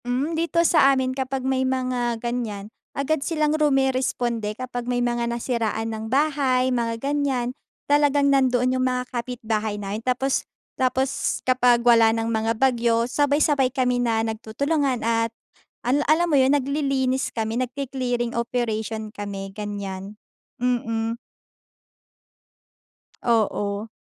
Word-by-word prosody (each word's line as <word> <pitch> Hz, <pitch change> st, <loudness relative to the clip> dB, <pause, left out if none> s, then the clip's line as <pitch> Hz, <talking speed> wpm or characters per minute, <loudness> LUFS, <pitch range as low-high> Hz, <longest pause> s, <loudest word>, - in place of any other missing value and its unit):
Mm, 260 Hz, +6 st, -1 dB
dito 335 Hz, +1 st, +1 dB
sa 295 Hz, -5 st, +5 dB
amin 260 Hz, 0 st, 0 dB
kapag 260 Hz, 0 st, -3 dB
may 265 Hz, 0 st, +1 dB
mga 255 Hz, -2 st, 0 dB
ganyan, 225 Hz, -4 st, -4 dB, 0.2 s
agad 280 Hz, +2 st, 0 dB
silang 305 Hz, -1 st, 0 dB
rumeresponde 260 Hz, -7 st, 0 dB
kapag 245 Hz, -1 st, -5 dB
may 245 Hz, -, +1 dB
mga 240 Hz, -1 st, 0 dB
nasiraan 225 Hz, -2 st, -2 dB
ng 220 Hz, 0 st, -5 dB
bahay, 265 Hz, -2 st, +2 dB
mga 230 Hz, -2 st, -1 dB
ganyan, 275 Hz, -2 st, -1 dB, 0.3 s
talagang 285 Hz, -1 st, +3 dB
nando’n 255 Hz, -2 st, +3 dB
yung -, -, +2 dB
mga 250 Hz, 0 st, -1 dB
kapitbahay 225 Hz, -3 st, -2 dB
namin 205 Hz, +1 st, -4 dB
tapos 255 Hz, +2 st, 0 dB, 0.3 s
tapos 260 Hz, +1 st, -1 dB
kapag 245 Hz, -2 st, +3 dB
wala 230 Hz, -2 st, +6 dB
nang 225 Hz, 0 st, -1 dB
mga 220 Hz, +1 st, 0 dB
bagyo, 235 Hz, -2 st, +2 dB
sabay-sabay 285 Hz, 0 st, +2 dB
kami 250 Hz, -1 st, 0 dB
na 225 Hz, -2 st, +1 dB
nagtutulungan 250 Hz, +4 st, -1 dB
at 230 Hz, 0 st, +1 dB, 0.6 s
ala 265 Hz, +4 st, +2 dB
alam 335 Hz, +3 st, +4 dB
mo -, -, +6 dB
yun, 270 Hz, +2 st, +4 dB
naglilinis 275 Hz, -2 st, 0 dB
kami, 225 Hz, +2 st, -2 dB
nagke-clearing 250 Hz, -2 st, -2 dB
operation 220 Hz, -2 st, -2 dB
kami, 195 Hz, -2 st, -6 dB
ganyan. 200 Hz, -1 st, -6 dB, 0.4 s
Mhm. 230 Hz, -2 st, -1 dB, 2.1 s
Oo. 210 Hz, -2 st, 0 dB
245 Hz, 120 wpm, -23 LUFS, 225-270 Hz, 2.1 s, wala